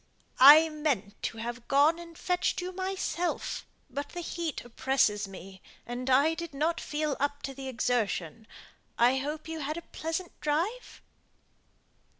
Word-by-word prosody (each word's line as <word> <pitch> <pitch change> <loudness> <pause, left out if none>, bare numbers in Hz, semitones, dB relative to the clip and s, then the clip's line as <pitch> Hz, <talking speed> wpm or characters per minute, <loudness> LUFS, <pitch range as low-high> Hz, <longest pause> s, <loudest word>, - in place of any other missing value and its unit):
"I 295 +5 +10
meant 275 -10 -2
to - - -3
have 235 +1 -6
gone 295 +4 +4
and 335 -1 -11
fetched 360 -1 0
you 360 0 -4
myself; 370 -2 -2 0.2
but 285 +1 -5
the 350 - -6
heat 335 -5 -4
oppresses 230 -4 +1
me, 190 0 -11 0.2
and 245 +2 -4
I 280 +5 +5
did 330 -3 -6
not 320 +4 0
feel 300 -1 -2
up 285 +1 -1
to 270 - -4
the 270 0 -7
exertion. 225 -5 -1 0.5
I 245 +3 +4
hope 300 +4 -4
you 320 0 -5
had 305 +2 -3
a 340 - -6
pleasant 325 +3 -4
drive?" 345 +12 -2
290 Hz, 150 wpm, -29 LUFS, 245-330 Hz, 0.5 s, I